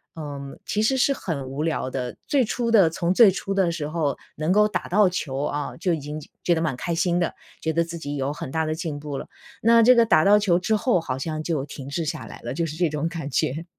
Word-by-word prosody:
呃， 145 Hz, -3 st, -6 dB, 0.3 s
其 210 Hz, +1 st, 0 dB
实 265 Hz, +4 st, +3 dB
是 265 Hz, +2 st, +3 dB
很 150 Hz, -, -3 dB
无 140 Hz, +3 st, -3 dB
聊 160 Hz, -5 st, -1 dB
的， 125 Hz, -2 st, -4 dB
最 270 Hz, -5 st, +3 dB
初 235 Hz, +1 st, -2 dB
的 200 Hz, -7 st, +6 dB
从 170 Hz, +2 st, -1 dB
最 220 Hz, -5 st, +8 dB
初 195 Hz, +1 st, -5 dB
的 190 Hz, -3 st, +2 dB
时 155 Hz, -3 st, -3 dB
候 155 Hz, -3 st, -1 dB, 0.2 s
能 155 Hz, +3 st, -1 dB
够 210 Hz, +2 st, +5 dB
打 210 Hz, -, -3 dB
到 200 Hz, 0 st, +4 dB
球 140 Hz, -6 st, -3 dB
啊， 145 Hz, -1 st, -3 dB
就 180 Hz, +1 st, 0 dB
已 -, -, -5 dB
经 150 Hz, +2 st, -6 dB, 0.2 s
觉 175 Hz, -, +3 dB
得 160 Hz, -, 0 dB
蛮 155 Hz, -6 st, 0 dB
开 170 Hz, -, -2 dB
心 175 Hz, +1 st, +1 dB
的， 170 Hz, -, 0 dB, 0.3 s
觉 160 Hz, 0 st, -1 dB
得 170 Hz, +1 st, +2 dB
自 170 Hz, 0 st, -7 dB
己 145 Hz, -2 st, -5 dB
有 135 Hz, +1 st, -1 dB
很 135 Hz, -3 st, -6 dB
大 160 Hz, +1 st, 0 dB
的 155 Hz, 0 st, -1 dB
进 160 Hz, -3 st, -4 dB
步 145 Hz, -2 st, -5 dB
了， -, -, -7 dB, 0.4 s
那 230 Hz, 0 st, +6 dB
这 250 Hz, +2 st, +7 dB
个 235 Hz, -1 st, +5 dB
打 155 Hz, -8 st, +4 dB
到 205 Hz, +1 st, +6 dB
球 185 Hz, -4 st, +2 dB
之 215 Hz, +4 st, +1 dB
后 210 Hz, -5 st, +2 dB
好 130 Hz, -5 st, -3 dB
像 155 Hz, +3 st, -3 dB
就 155 Hz, -4 st, -2 dB
停 140 Hz, -1 st, -9 dB
滞 165 Hz, +3 st, -2 dB
下 -, -, -4 dB
来 -, -, -10 dB
了， 120 Hz, +2 st, -4 dB
就 170 Hz, -, -1 dB
是 155 Hz, -, -6 dB
这 175 Hz, -1 st, +1 dB
种 150 Hz, +2 st, -2 dB
感 165 Hz, -4 st, -5 dB
觉。 155 Hz, +6 st, -1 dB
165 Hz, 285 characters per minute, -24 LUFS, 145-190 Hz, 0.4 s, 最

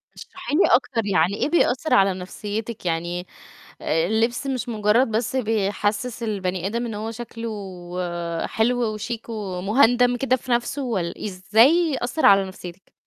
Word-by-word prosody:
اشرحي 360 Hz, -5 st, -6 dB
لي 370 Hz, -, +5 dB
أكتر، 245 Hz, -3 st, -1 dB
يعني 185 Hz, -1 st, +2 dB
إيه 295 Hz, -, -1 dB
بيأثر 315 Hz, -3 st, +2 dB
على 195 Hz, -1 st, +5 dB
نفسيتِك؟ 205 Hz, +4 st, -6 dB
يعني 175 Hz, +2 st, -2 dB, 0.5 s
آآ، 160 Hz, +1 st, +1 dB
اللبس 230 Hz, +6 st, 0 dB
مش 255 Hz, -2 st, -2 dB
مجرد 220 Hz, +2 st, +2 dB
بس 225 Hz, +4 st, -1 dB
بيحسس 215 Hz, +1 st, -1 dB
البني 190 Hz, -5 st, -2 dB
آدم 235 Hz, +4 st, -2 dB
إن 225 Hz, -, -5 dB
هو 215 Hz, +2 st, -4 dB
شكله 230 Hz, 0 st, -6 dB, 1.0 s
حلو 235 Hz, 0 st, 0 dB
وشيك 225 Hz, +2 st, -5 dB
ومهُندَم 225 Hz, +5 st, +2 dB
كده 255 Hz, +1 st, +1 dB
في 250 Hz, 0 st, -11 dB
نفسه، 245 Hz, +4 st, 0 dB
والّ– 190 Hz, -8 st, -3 dB
إزاي 235 Hz, -, +3 dB
أثّر 250 Hz, +6 st, +1 dB
على 195 Hz, -1 st, +6 dB
نفسيتِك؟ 180 Hz, -1 st, -11 dB
225 Hz, 140 wpm, -23 LUFS, 195-245 Hz, 1.0 s, على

